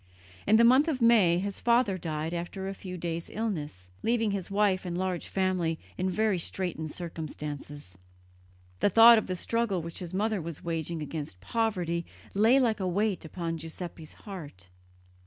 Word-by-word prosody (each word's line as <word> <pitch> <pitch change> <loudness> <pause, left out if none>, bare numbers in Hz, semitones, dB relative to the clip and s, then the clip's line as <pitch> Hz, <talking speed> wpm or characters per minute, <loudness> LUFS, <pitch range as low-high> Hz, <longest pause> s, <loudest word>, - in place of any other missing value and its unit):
In 215 - +6
the 230 - +6
month 260 +6 +6
of 295 -6 0
May 220 -8 +5
his 200 +2 -3
father 235 -4 +3
died 160 -2 -3
after 175 +3 -4
a 195 - -3
few 185 -1 -7
days' 170 -1 -4
illness, 150 - -4
leaving 225 -2 +1
his 195 -3 -3
wife 200 -2 +2
and 175 -2 -3
large 185 -1 -2
family 185 -4 0 0.2
in 185 +1 -1
very 205 0 +1
straitened 165 -3 -3
circumstances. 150 - -7 0.8
The - - +3
thought 225 +3 +9
of - - -6
the 185 - -2
struggle 200 -2 -1
which 170 0 -7
his 175 -2 -6
mother 210 +1 0
was 165 0 -7
waging 165 -1 -3
against 145 - -6
poverty 175 - -1 0.3
lay 225 +7 +5
like 230 -5 +2
a 190 - -1
weight 200 0 0
upon 165 0 -4
Giuseppe's 165 0 -7
heart. 145 - -10
185 Hz, 165 wpm, -29 LUFS, 165-210 Hz, 0.8 s, thought